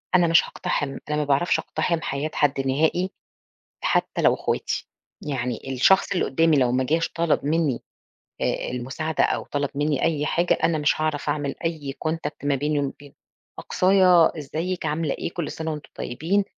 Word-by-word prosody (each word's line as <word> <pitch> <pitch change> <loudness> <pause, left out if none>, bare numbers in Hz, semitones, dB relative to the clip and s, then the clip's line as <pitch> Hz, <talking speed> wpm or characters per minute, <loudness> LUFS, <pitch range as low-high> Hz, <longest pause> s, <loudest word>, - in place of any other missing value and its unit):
أنا 175 -2 +5
مش 165 0 +5
هاقتحم، 135 -2 -3
أنا 150 - 0
ما 150 - +1
باعرفش 145 +5 +2
أقتحم 170 -2 -1
حياة 145 0 -3
حد 145 -2 +1
نهائي 160 +7 +1 0.7
حتى - - +1
لو - - +5
اخواتي، - - -2 0.3
يعني 125 -5 -3
الشخص 190 +12 +4
اللي 185 - +1
قدامي 160 +2 +3
لو 125 -2 +3
ما 130 +1 +1
جاش 160 +5 +1
طلب 165 -4 0
مني 150 -5 0 0.6
آآ - - -1
المساعدة 135 +6 -1
أو - - 0
طلب 145 -1 -2
مني 145 0 0
أي 150 -2 +1
حاجة، 170 +3 +2
أنا 165 - +3
مش 150 +1 +1
هاعرف 155 -1 -1
أعمل 145 -1 -1
أي 155 -5 -3
Contact 160 -2 -3
ما 145 - +2
بيني 145 +2 0
وما 140 -1 -1
بينه، 145 -1 -14 0.5
أقصايا 185 -3 +4
إزيِك 165 +4 -3
عاملة 155 -1 0
إيه؟ - - -5
كل 170 -3 -3
سنة 160 0 -4
وأنتم 150 -1 -7
طيبين، 175 +11 0
150 Hz, 170 wpm, -24 LUFS, 140-165 Hz, 0.7 s, أنا